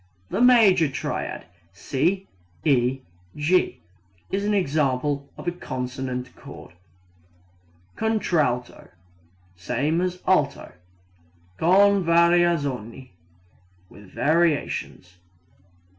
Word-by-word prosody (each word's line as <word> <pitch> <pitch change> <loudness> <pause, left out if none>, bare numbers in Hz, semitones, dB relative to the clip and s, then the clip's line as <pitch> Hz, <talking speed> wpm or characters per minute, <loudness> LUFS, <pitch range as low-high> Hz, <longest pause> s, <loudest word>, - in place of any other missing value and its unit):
The - - -1
major 215 -9 +5
triad 135 - -4 0.3
C 170 - -1 0.4
E 130 -2 +2 0.3
G 170 +5 +1 0.5
is 195 +1 -1
an 210 - +1
example 140 -4 -1
of - - -10
a - - +2
consonant 130 -5 -5
chord. - - -12 1.2
Contralto 165 - -1 0.7
same 140 - -1
as 180 0 -2
alto. 150 -7 +1 0.9
Con 195 +3 +4
variazioni 165 -8 +1 0.8
with 100 -2 -15
variations. 145 - -1
150 Hz, 80 wpm, -24 LUFS, 130-180 Hz, 1.2 s, major